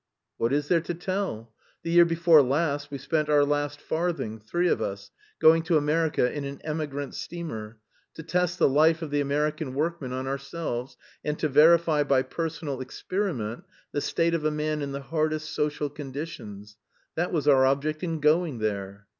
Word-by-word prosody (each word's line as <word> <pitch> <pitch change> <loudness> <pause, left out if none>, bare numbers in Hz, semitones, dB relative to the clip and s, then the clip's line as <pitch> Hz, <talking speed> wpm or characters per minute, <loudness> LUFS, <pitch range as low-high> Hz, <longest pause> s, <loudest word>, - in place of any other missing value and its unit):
"What 115 +1 0
is 145 +1 0
there 170 0 +3
to 170 - -4
tell? 175 - -3 0.3
The 165 - -3
year 170 0 +7
before 165 -2 +5
last 145 +1 0
we 140 - -5
spent 150 +3 -1
our 145 -1 +5
last 145 0 -1
farthing, 160 -10 -2
three 175 +12 0
of - - +1
us, 100 0 -5 0.3
going 160 +1 +6
to 165 -2 +3
America 150 -4 +1
in 145 - -4
an 140 0 -6
emigrant 150 -3 -4
steamer, 115 -11 -6 0.4
to 160 - -8
test 180 +2 0
the 175 - +4
life 160 +4 +3
of 155 - -6
the 145 0 +1
American 150 0 -1
workman 155 -3 -2
on 130 +1 -3
ourselves, 135 -2 -4 0.3
and 150 0 -2
to 155 - 0
verify 155 +2 +5
by 135 -2 +2
personal 160 -5 -4
experiment 130 - -3 0.3
the 145 - -1
state 170 +3 +1
of 165 -2 0
a 155 - +2
man 150 0 -2
in 140 -1 -3
the 140 0 -4
hardest 155 +1 -2
social 150 0 -1
conditions. 135 -8 -8 0.4
That 175 +2 -1
was 150 -4 -1
our 135 -2 +6
object 150 +3 0
in 165 -3 -2
going 155 -2 +2
there." 100 -2 -3
150 Hz, 180 wpm, -26 LUFS, 135-165 Hz, 0.4 s, year